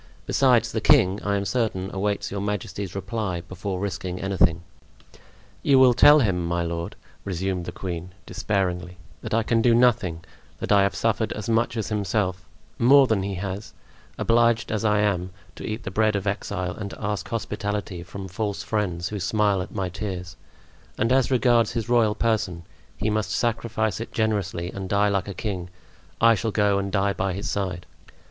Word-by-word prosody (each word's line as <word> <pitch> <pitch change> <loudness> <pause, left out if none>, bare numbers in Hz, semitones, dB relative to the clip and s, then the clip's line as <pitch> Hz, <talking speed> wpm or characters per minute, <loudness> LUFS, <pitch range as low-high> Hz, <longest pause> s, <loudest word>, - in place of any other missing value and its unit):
Besides, - - +3
the - - -2
king, 95 +2 +4
I 100 0 0
am 100 0 -1
certain, 95 -2 -1
awaits 100 +1 -1
your 100 0 -3
majesty's 100 -1 -4
reply 95 -2 -3
before 95 +1 -5
risking 95 -2 -4
anything." 85 -4 +1 1.0
"You 140 - +4
will 130 -1 +7
tell 150 +5 +7
him, 95 -6 +1
my 85 0 -1
lord," 85 0 -4 0.3
resumed 95 -1 -2
the - - -5
queen, 90 -1 -6
despairingly, 90 -3 -2 0.2
"that - - -2
I 115 - +2
can 115 +1 +2
do 115 0 +4
nothing; 105 -9 +2 0.3
that - - -4
I 100 -1 +6
have 100 0 +1
suffered 115 -1 0
as 105 +1 -6
much 115 +1 +1
as 110 - -2
himself—more 105 +6 +2
than 110 -6 +1
he 100 0 -3
has—obliged 110 +4 -1
as 110 -1 -1
I 105 -1 +3
am 95 -3 0 0.3
to - - -9
eat 110 +2 -4
the 100 - -5
bread 110 +1 +2
of 100 0 -2
exile 95 -3 -2
and 100 - -6
to - - -10
ask 105 -3 -3
hospitality 105 -4 -3
from 95 +2 -8
false 100 +2 -3
friends 95 -5 -2
who 105 - -4
smile 100 +1 +1
at 90 - -7
my 95 -3 -2
tears; 90 -2 -5 0.6
and 115 - +1
as 130 -1 +3
regards 120 -3 +3
his 115 0 -3
royal 115 -3 +3
person, 105 -7 -1 0.3
he 110 - -1
must 110 -1 -1
sacrifice 110 -2 -1
it 115 - -6
generously 100 -5 -1
and 95 -1 -6
die 100 +1 +3
like 100 -1 0
a 100 - -6
king. 95 -5 -4 0.5
I 115 0 +6
shall 115 +1 -1
go 100 -2 +2
and 100 0 -3
die 100 0 +1
by 95 -1 -1
his 100 +3 -4
side." 90 -3 -3
100 Hz, 180 wpm, -24 LUFS, 95-110 Hz, 1.0 s, will